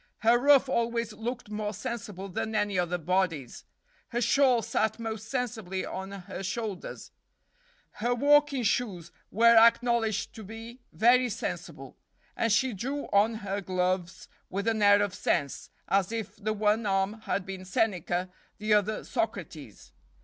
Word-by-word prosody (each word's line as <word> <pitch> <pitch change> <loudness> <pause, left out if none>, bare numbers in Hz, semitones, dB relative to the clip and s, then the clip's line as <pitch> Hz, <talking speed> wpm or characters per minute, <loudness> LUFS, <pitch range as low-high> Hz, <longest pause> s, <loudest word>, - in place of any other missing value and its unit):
Her 235 +2 +5
ruff 275 0 +5
always 235 -3 -1
looked 230 0 -5
more 210 0 -3
sensible 205 -3 -5
than 220 +3 -3
any 205 -3 +1
other 180 0 0
body's; 165 -6 -1 0.4
her 240 - -2
shawl 250 -1 +3
sat 220 0 0
most 220 -1 -5
sensibly 220 -7 -3
on 190 +1 -6
her 190 -1 -7
shoulders; 195 0 -5 0.8
her 240 +3 -1
walking 285 0 +4
shoes 200 -7 -1 0.2
were 230 +2 +5
acknowledged 230 -1 +3
to 220 - -9
be 225 +4 -9
very 245 +2 +4
sensible, 215 - -6 0.4
and 230 - 0
she 255 +4 +2
drew 270 +9 -4
on 210 +3 +4
her 200 +1 -2
gloves 185 -1 -2 0.2
with 200 +3 -3
an 220 -1 +1
air 205 0 +6
of 200 -3 -2
sense, 150 -8 -1 0.2
as 195 0 +1
if 225 -3 -4
the 215 +1 -2
one 215 +1 +1
arm 195 +3 0
had 195 - -1
been 190 -1 -7
Seneca, 185 -2 -1 0.3
the 215 0 +1
other 210 +1 +1
Socrates. - - -5
215 Hz, 145 wpm, -28 LUFS, 195-235 Hz, 0.8 s, air